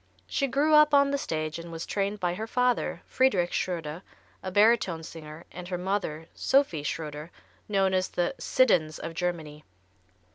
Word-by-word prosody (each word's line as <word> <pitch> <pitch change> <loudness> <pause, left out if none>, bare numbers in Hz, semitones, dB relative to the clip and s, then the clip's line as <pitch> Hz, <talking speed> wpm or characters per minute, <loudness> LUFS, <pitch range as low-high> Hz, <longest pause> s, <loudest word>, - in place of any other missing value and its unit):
She 275 - -1
grew 285 +4 +2
up 300 -1 +7
on 280 0 +5
the 280 - +1
stage, 155 - -3
and 170 0 -9
was 165 0 -5
trained 200 +1 -2
by 175 -2 0
her 220 +5 -5
father, 250 +1 0
Friedrich 195 -10 +2
Schröder, 165 -2 -3 0.4
a 190 - -4
baritone 205 -4 +3
singer, 160 0 -10
and 180 0 -8
her 180 -1 -3
mother, 180 -4 -2
Sophie 265 - +2
Schröder, 150 0 -5 0.4
known 195 -2 +2
as 185 0 +1
the 175 +8 -1
"Siddons 175 -12 +2
of 165 - -6
Germany." 160 -4 -4
180 Hz, 160 wpm, -27 LUFS, 160-225 Hz, 0.4 s, up